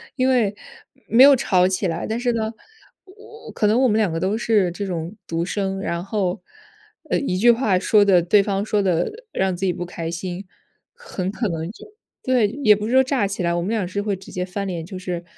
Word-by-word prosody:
因 260 -1 +1
为 220 -6 +2 0.5
没 245 +3 +6
有 280 -1 +8
吵 185 -6 +2
起 190 0 -1
来， 165 0 -3
但 225 +2 -2
是 245 -1 0
呢， 220 0 -2 0.5
我 430 +3 -14
可 210 - 0
能 225 +5 +3
我 260 - +4
们 215 -1 +2
两 210 -6 +1
个 165 - -2
都 195 +5 0
是 210 -6 +2
这 200 +3 -5
种 175 +1 -5
独 165 0 -2
生 195 +1 -2
然 170 -3 -3
后， 200 -2 -2 0.7
呃， - - +1
一 185 -10 -2
句 240 +5 +4
话 220 -6 +1
说 205 +1 +4
得 185 -3 +5
对 200 +4 +4
方 200 -1 -1
说 210 -1 0
得 175 -2 0 0.2
让 190 -1 0
自 190 +2 -3
己 180 - +1
不 175 - -5
开 165 -1 -5
心， 180 +2 -5 0.5
很 205 - -5
可 220 0 -2
能 165 +2 -4
就 - - -14 0.4
对， 250 -5 +2 0.2
也 210 -2 +7
不 210 +1 -4
是 - - -3
说 265 - +6
炸 260 -6 0
起 195 -2 -4
来， 170 - +1
我 175 - -1
们 185 - -3
俩 220 -5 0
是 200 +3 -3
会 205 -1 -1
直 190 - -13
接 180 - -3
翻 195 +2 -4
脸， 170 -3 -4
就 185 +2 -8
是 180 -2 -5
200 Hz, 250 characters per minute, -21 LUFS, 180-220 Hz, 0.7 s, 有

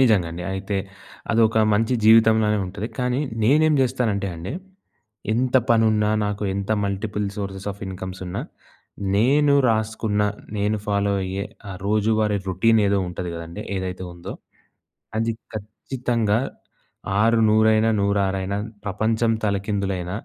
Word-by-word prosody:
నిజంగండి. 90 -9 +2
అయితే 95 +1 -3 0.6
అదొక 110 0 +3 0.2
మంచి 115 +4 +1
జీవితంలా‌నే 110 -1 +5
ఉంటది. 100 +4 -5
కానీ 125 +2 0 0.2
నేనేం 155 +6 +4
జేస్తానంటే 120 -6 0
అండి, 85 +4 -6 0.8
ఎంత 125 +2 +2
పనున్నా, 110 -2 +3
నాకు 105 0 -3
ఎంత 100 +2 -3
మల్టిపుల్ 100 +1 -2
సోర్సెస్ 100 -1 -5
ఆఫ్ 100 - -17
ఇన్కమ్స్ 95 0 -6
ఉన్నా, 90 - -4 0.7
నేను 140 +6 +4
రాసుకున్న 110 -1 0 0.3
నేను 105 +1 +1
ఫాలో 100 -1 +1
అయ్యే 95 +1 -3 0.3
ఆ - - -5
రోజువారీ 105 0 +2
రొ‌‌టీన్ 110 +5 +3
ఏదో 100 0 +2
ఉంటది 90 0 -5
గదండీ, 85 +5 -7
ఏదైతే 95 0 -4
ఉందో, 85 0 -8 0.9
అది 115 +1 +1 0.2
ఖచ్చితంగా 110 +1 -1 0.8
ఆరు 115 +1 +4
నూరైన, 110 +1 +4
నూరా‌రైనా, 100 -1 0 0.3
ప్రపంచం 110 +3 +1
తలకిందులైన, 100 -3 -1
105 Hz, 115 wpm, -23 LUFS, 100-115 Hz, 0.9 s, జీవితంలా‌నే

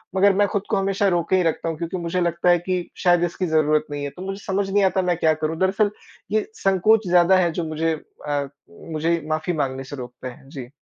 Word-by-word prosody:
मगर 200 +1 +5
मैं 205 +1 +3
खुद 200 -1 -2
को 220 - +1
हमेशा 195 +1 +1
रोके 175 -1 +1
ही 185 - +3
रखता 165 0 -1
हूँ 160 - -4
क्योंकि 170 +3 -4
मुझे 175 +1 -2
लगता 170 +1 +1
है 175 - +6
कि 180 0 -3
शायद 175 -2 +4
इसकी 175 +2 -1
ज़रूरत 155 -1 +2
नहीं 145 0 -4
है। 145 - -2
तो 180 - -10
मुझे 195 +1 -5
समझ 195 0 -1
नहीं 200 +1 +2
आता 190 0 +2
मैं 180 -2 0
क्या 160 -2 +3
करूँ? 155 +1 -3
दरअसल 195 +2 +2 0.4
ये 215 0 +1 0.2
संकोच 195 +2 +3
ज़्यादा 180 +1 +5
है 175 -2 +2
जो 170 +1 -3
मुझे 160 +1 -1 0.3
अ, 145 -1 -1 0.4
मुझे 165 +2 0
माफ़ी 155 +3 -1
माँगने 135 -4 -2
से 135 +2 -8
रोकता 125 -1 -8
है। 130 +2 -11
जी। 130 -4 -8
175 Hz, 235 wpm, -22 LUFS, 155-190 Hz, 0.4 s, है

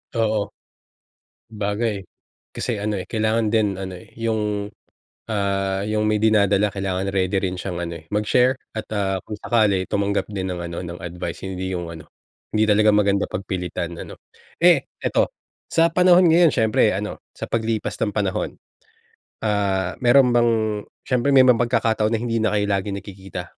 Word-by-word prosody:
Oo. 110 -2 +1 1.1
'bagay 105 -1 -2 0.5
kasi 110 -4 -2
ano, 105 0 -1
eh, 95 - -3
kailangan 110 0 0
din 105 -3 +2
ano, 95 -1 -6
eh, - - -18
yung, 105 -2 -2 0.5
ah, 100 -2 -1
yung 105 +1 0
may 105 0 +1
dinadala 105 -2 +3
kailangan 95 -1 -2
ready 95 0 0
rin 90 -1 -2
siyang 90 -2 -4
ano 85 -1 -4
eh, 80 - -16
mag-share 125 +5 +3 0.2
at, 110 - -3
ah, 95 -2 0
kung 105 - -7
sakali 105 -5 +2
tumanggap 100 +1 0
din 95 -3 -3
ng 85 - -5
ano, 85 +1 -5
ng 85 0 -8
advice, 85 0 -6
hindi 95 0 -4
yung 85 -2 -4
ano, 80 -2 -9 0.5
hindi 110 0 +2
talaga 105 0 +5
maganda 100 -1 +2
pagpilitan, 90 -2 -4
ano? - - -10 0.5
Eh, 170 -6 +5 0.2
eto - - +1 0.3
sa 165 0 +3
panahon 180 0 +5
ngayon 165 -2 +5
siyempre 110 -2 +3
ano, 105 +2 -4 0.2
sa - - -7
paglipas 110 -1 -1
ng 105 -2 -1
panahon, 100 -3 -1 0.9
ah, 100 -4 0
mayro'n 125 0 +5
bang 120 -1 +4 0.6
siyempre 125 +2 +1
may 130 -1 +7
mga 125 - +7
pagkakataon 115 -2 +1
na 115 - +1
hindi 115 -1 -1
na 110 - +2
kayo 105 -1 +1
lagi 100 0 -1
nagkikita? 95 -2 -7
105 Hz, 160 wpm, -22 LUFS, 95-110 Hz, 1.1 s, may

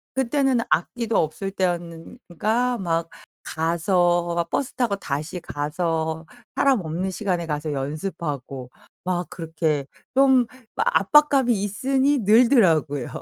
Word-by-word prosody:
그때는 265 -1 +1
악기도 230 +7 0
없을 180 +5 -1
때였는 175 0 -3 0.2
가 245 +3 +1
막 165 -2 -1 0.3
가서 175 +1 +1
막 170 -1 -1
버스 280 0 -2
타고 235 -6 0
다시 155 +2 -4
가서 160 +2 -2 0.3
사람 265 -7 +3
없는 175 +4 -3
시간에 180 -4 -2
가서 150 0 -3
연습하고 140 -3 -5 0.3
막 180 -1 -2
그렇게 160 -4 -2 0.3
좀 265 -2 +5 0.3
막 - - 0
압박감이 275 +1 +4
있으니 265 +7 +1
늘더라고요. 195 - +3
175 Hz, 250 characters per minute, -23 LUFS, 160-235 Hz, 0.3 s, 좀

